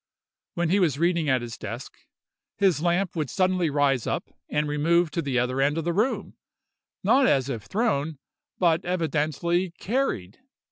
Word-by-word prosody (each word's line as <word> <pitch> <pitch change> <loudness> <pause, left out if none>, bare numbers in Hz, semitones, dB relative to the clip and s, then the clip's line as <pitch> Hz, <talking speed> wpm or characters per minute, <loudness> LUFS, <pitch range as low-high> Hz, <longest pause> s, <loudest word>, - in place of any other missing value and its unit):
When 175 -1 0
he 200 - +4
was 160 -8 +2
reading 170 -1 +1
at 130 -2 +2
his 115 -1 -7
desk, - - -7 0.6
his 190 -6 +2
lamp 175 +2 +1
would 155 -5 -2
suddenly 185 -3 +1
rise 140 -4 +1
up - - -3 0.2
and 150 0 0
remove 160 +3 +2
to 170 - -1
the 135 -4 -1
other 125 +2 0
end 145 +3 +2
of 165 - -1
the 170 - 0
room—not 260 +4 -1
as 135 - +2
if 115 -6 -4
thrown, 160 - 0 0.4
but 170 -1 +2
evidently 170 +1 0
carried. 190 - -2
165 Hz, 155 wpm, -25 LUFS, 140-180 Hz, 0.6 s, he